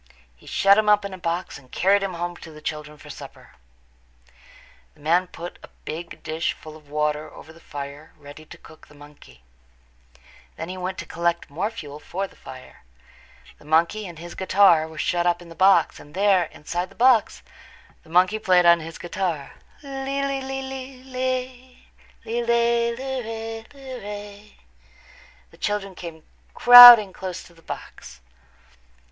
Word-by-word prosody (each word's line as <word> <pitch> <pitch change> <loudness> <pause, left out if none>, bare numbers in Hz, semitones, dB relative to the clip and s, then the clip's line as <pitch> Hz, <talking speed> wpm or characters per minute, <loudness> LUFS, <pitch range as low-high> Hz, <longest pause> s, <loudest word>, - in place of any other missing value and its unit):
He 60 - -21
shut 200 +1 +4
him 215 -1 +1
up 210 -1 +4
in 200 - -6
a - - -7
box 170 -2 -4
and 130 -2 -22
carried 195 +2 +2
him 195 -2 -3
home 175 +1 -4
to 160 - -12
the 155 - -12
children 150 -1 -6
for - - -12
supper. - - -12 1.4
The - - -25
man 170 +5 +1
put 175 0 -9
a - - -12 0.2
big 165 +2 -7
dish 160 +1 -2
full 155 -1 -13
of 150 -2 -17
water 150 +1 -2
over 160 - -14
the 165 - -17
fire 145 0 -9
ready 145 +1 -13
to - - -13
cook 155 - -17
the 150 - -19
monkey. 145 - -17 1.1
Then 160 - -7
he 185 - -5
went 185 +1 -5
away - - -6
to - - -13
collect 170 0 -1
more 180 +8 -2
fuel 150 -10 -9
for 185 +5 -4
the - - -15
fire. 130 -1 -13 0.8
The - - -19
monkey 170 +7 +1
and 170 -2 -11
his 170 +2 -9
guitar 185 -4 +4
were 160 -1 -13
shut 175 +3 0
up 175 0 +1
in 175 -1 -14
the - - -10
box, 185 -1 +3
and 145 +3 -15
there, 195 -2 +3
inside 175 +4 -5
the 195 - -19
box, 245 -2 +3 0.6
the - - -21
monkey 185 +5 +3
played 180 -4 +3
on 170 0 +6
his 165 0 -9
guitar. 175 -5 -4 0.3
"Lee, 275 0 -3
lee, 275 -1 -2
lee, 270 0 -5
lee, 265 -1 -8
lee 265 0 -16
lay, 255 0 -2 0.7
lee 235 +1 -2
lay, 235 0 +1
lee 265 +1 -4
ray, 225 0 -6
lee 265 -2 -9
ray." 205 0 -10 0.9
The - - -19
children 205 -2 -3
came 165 -3 -10 0.3
crowding 245 -5 +10
close 185 -2 -6
to 170 - -18
the 165 - -21
box. - - -10
180 Hz, 175 wpm, -23 LUFS, 160-225 Hz, 1.4 s, crowding